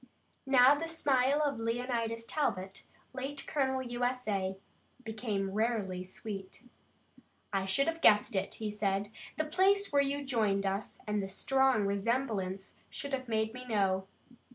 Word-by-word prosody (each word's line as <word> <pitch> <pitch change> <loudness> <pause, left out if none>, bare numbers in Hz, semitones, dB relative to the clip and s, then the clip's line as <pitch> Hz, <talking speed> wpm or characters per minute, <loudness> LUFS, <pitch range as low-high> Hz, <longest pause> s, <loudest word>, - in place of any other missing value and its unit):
Now 260 0 +7
the 310 +3 -2
smile 285 -3 +2
of 280 -5 0
Leonidas 230 0 -1
Talbot, 195 -11 -2 0.3
late 275 +2 -5
colonel 265 -3 0
U. 240 0 -4
S. 250 0 -1
A., 190 -2 -1 0.5
became 215 -4 -2
rarely 205 -4 -1
sweet. 195 +2 -8 0.9
"I 195 -1 0
should 275 +9 +2
have 330 0 -2
guessed 210 -2 +5
it," 190 - -1
he 215 -1 -3
said. 205 -1 0 0.3
"The 310 - 0
place 385 +5 +3
where 285 -1 +5
you 280 +1 -1
joined 210 -6 +1
us 195 +2 -3
and 210 -1 0
the 195 - -4
strong 265 +2 +2
resemblance 200 -2 -1
should 280 -1 -5
have 260 -1 -2
made 220 -1 0
me 250 0 -8
know. 190 -4 +1
230 Hz, 150 wpm, -32 LUFS, 200-270 Hz, 0.9 s, Now